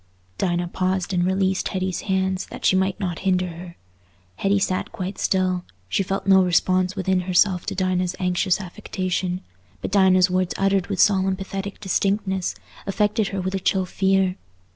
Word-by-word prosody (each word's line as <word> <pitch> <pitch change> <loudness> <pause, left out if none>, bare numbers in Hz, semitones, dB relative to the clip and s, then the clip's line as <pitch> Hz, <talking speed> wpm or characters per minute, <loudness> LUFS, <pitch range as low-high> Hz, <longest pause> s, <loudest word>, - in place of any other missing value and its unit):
Dinah 175 -1 0
paused 185 +1 -1
and 175 -1 +2
released 190 +1 +1
Hetty's 185 -1 -2
hands 190 -1 -1
that - - -8
she - - +5
might 190 +1 +1
not 180 -5 -3
hinder 185 -1 +1
her. 170 +1 -9 0.6
Hetty 200 +1 +2
sat 185 -1 -1
quite 190 +1 -5
still; 185 -1 +1 0.2
she 145 - 0
felt 195 +1 -2
no 190 -1 +6
response 185 +1 +2
within 190 -1 +1
herself 180 0 +3
to - - -2
Dinah's 185 -1 0
anxious 180 +1 +1
affection; 185 -1 -3 0.4
but - - -5
Dinah's 190 -2 +5
words 185 -1 0
uttered 195 -1 +1
with 195 -3 -3
solemn 190 -2 +4
pathetic 195 +1 -6
distinctness, 190 -1 0 0.3
affected 210 +2 +1
her 195 - -3
with 185 +1 -3
a 195 - 0
chill 190 0 +1
fear. 190 0 +1
190 Hz, 165 wpm, -23 LUFS, 185-195 Hz, 0.6 s, no